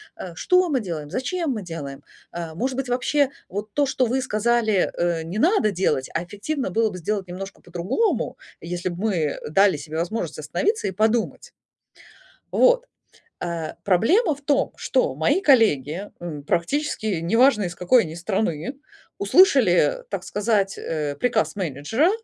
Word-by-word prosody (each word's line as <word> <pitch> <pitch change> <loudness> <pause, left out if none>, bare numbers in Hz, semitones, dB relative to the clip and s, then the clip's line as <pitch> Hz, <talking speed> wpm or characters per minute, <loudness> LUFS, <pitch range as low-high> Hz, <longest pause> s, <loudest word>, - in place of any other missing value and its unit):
э, 175 -3 -8
что 365 - +3
мы 270 -4 +1
делаем, 160 -8 -5
зачем 325 - -2
мы 215 -5 -3
делаем? 145 -5 -7 0.3
А, 170 -2 -6
может 255 +7 -2
быть 270 -1 -2
вообще 275 +3 +2 0.2
вот 205 +2 -5
то, 290 -1 +2
что 260 -1 +1
вы 260 +3 0
сказали, 220 -3 +1
э, 170 -2 0
не 180 +6 -4
надо 320 - +3
делать, 160 -8 0
а 170 - -1
эффективно 205 - -3
было 220 +3 +1
бы - - -7
сделать 195 +1 -2
немножко 195 +2 -8
по-другому, 180 - -1 0.2
если 175 +1 -3
бы 175 - -6
мы, 205 -4 +1
э, 150 -2 -2
дали 195 +3 +4
себе 155 +2 -6
возможность 170 -2 -3
остановиться 395 - -1
и - - -1
подумать. 220 +4 0 1.0
Вот, - - +4 0.6
э, 170 -3 -3
проблема 305 - +3
в 285 - -17
том, 280 -1 +1
что - - 0
мои 380 - +2
коллеги, 205 - +3
м, 150 -5 -6
практически 220 - -1
неважно 225 +5 +4
из 175 -1 -4
какой 230 +8 +4
они 160 -2 -7
страны, 190 - -2 0.4
услышали, 370 - +4
так - - -4
сказать, 205 -2 0
э, 150 -3 -3
приказ 230 -4 +1
менеджера, 190 - 0
205 Hz, 155 wpm, -23 LUFS, 170-260 Hz, 1.0 s, дали